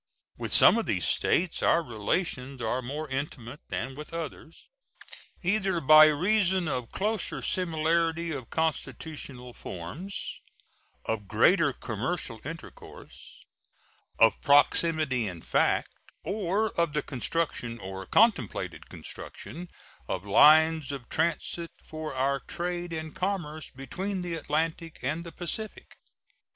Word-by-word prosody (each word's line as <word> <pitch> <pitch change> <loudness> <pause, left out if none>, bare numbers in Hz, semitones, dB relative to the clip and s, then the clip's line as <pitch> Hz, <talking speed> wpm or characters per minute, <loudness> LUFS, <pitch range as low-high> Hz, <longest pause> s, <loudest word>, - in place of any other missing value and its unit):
With - - -5
some - - +8
of - - -3
these - - 0
States 175 -1 +1
our 170 - +3
relations 130 - -2
are 120 +2 -1
more 145 +5 -5
intimate 135 -1 -5
than 110 +9 -3
with 150 +4 -9
others, 165 0 -7 0.8
either 190 -1 +1
by 155 +1 +8
reason 185 +3 +2
of 125 -5 -2
closer 210 0 -1
similarity 165 -1 +1
of 135 -6 -6
constitutional 140 -4 -3
forms, 145 - -6 0.6
of 105 -3 -2
greater 145 - +4
commercial 120 - -4
intercourse, 165 +3 -11 0.7
of 115 -1 +4
proximity 145 -3 +3
in 90 -4 -7
fact, - - +1 0.3
or 205 +2 0
of 170 -3 0
the 150 -1 0
construction 130 -3 -2
or 95 -2 -7
contemplated 210 - +1
construction 175 +2 -9 0.4
of 95 +1 -3
lines 155 +6 +6
of 135 -4 -7
transit 165 +1 -1 0.2
for 155 -3 -6
our 135 +1 +1
trade 175 +1 -4
and 160 -1 -5
commerce 170 -5 -3
between 185 +9 -4
the 175 -1 -3
Atlantic 160 +1 -2
and 155 +6 -1
the 170 - -8
Pacific. 195 +6 -4
155 Hz, 120 wpm, -28 LUFS, 130-170 Hz, 0.8 s, some